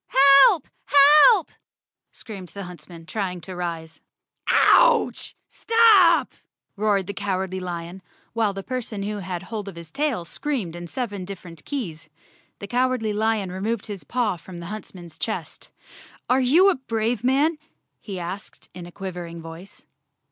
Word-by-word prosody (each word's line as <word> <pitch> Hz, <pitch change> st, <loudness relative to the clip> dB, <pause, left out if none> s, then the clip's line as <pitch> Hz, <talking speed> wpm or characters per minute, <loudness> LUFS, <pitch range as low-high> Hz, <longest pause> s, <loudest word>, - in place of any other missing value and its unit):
"Help! 345 Hz, -, 0 dB, 0.2 s
Help!" 300 Hz, -, +6 dB, 0.6 s
screamed 195 Hz, -5 st, -9 dB
the 200 Hz, -, -8 dB
huntsman, 170 Hz, -1 st, -11 dB
trying 185 Hz, -1 st, -3 dB
to 185 Hz, +2 st, -8 dB
rise. 165 Hz, -2 st, -5 dB, 0.5 s
"Ouch, -, -, +4 dB
Stop!" 430 Hz, -7 st, +4 dB, 0.4 s
roared 205 Hz, -2 st, +1 dB
the 200 Hz, -, -5 dB
Cowardly 190 Hz, -2 st, -3 dB
Lion, 175 Hz, 0 st, -6 dB, 0.3 s
while 225 Hz, -2 st, +1 dB
the 195 Hz, 0 st, -7 dB
person 230 Hz, -5 st, -4 dB
who 210 Hz, +1 st, -3 dB
had 180 Hz, -3 st, -5 dB
hold 215 Hz, -3 st, -6 dB
of 195 Hz, -, -8 dB
his 170 Hz, -1 st, -11 dB
tail 275 Hz, -, -1 dB
screamed 220 Hz, -, -3 dB
in 175 Hz, 0 st, -7 dB
seven 205 Hz, -4 st, -4 dB
dif¬ 195 Hz, +1 st, -7 dB
ferent 165 Hz, -3 st, -12 dB
keys. 170 Hz, -, -5 dB, 0.5 s
The -, -, -8 dB
Cowardly 245 Hz, -2 st, 0 dB
Lion 215 Hz, -3 st, 0 dB
removed 205 Hz, +4 st, -3 dB
his 205 Hz, -4 st, -7 dB
paw 235 Hz, -7 st, -1 dB
from 175 Hz, +1 st, -11 dB
the 170 Hz, -, -8 dB
huntsman's 180 Hz, -6 st, -10 dB
chest. -, -, -5 dB, 0.6 s
"Are 255 Hz, +2 st, +3 dB
you 335 Hz, +10 st, +5 dB
a -, -, -1 dB
brave 230 Hz, -2 st, -2 dB
man?" 290 Hz, +5 st, +2 dB, 0.4 s
he 195 Hz, -4 st, -7 dB
asked 180 Hz, +3 st, -8 dB
in 175 Hz, -1 st, -9 dB
a -, -, -12 dB
quavering 175 Hz, -3 st, -7 dB
voice. 165 Hz, +4 st, -11 dB
200 Hz, 150 wpm, -23 LUFS, 180-250 Hz, 0.6 s, Help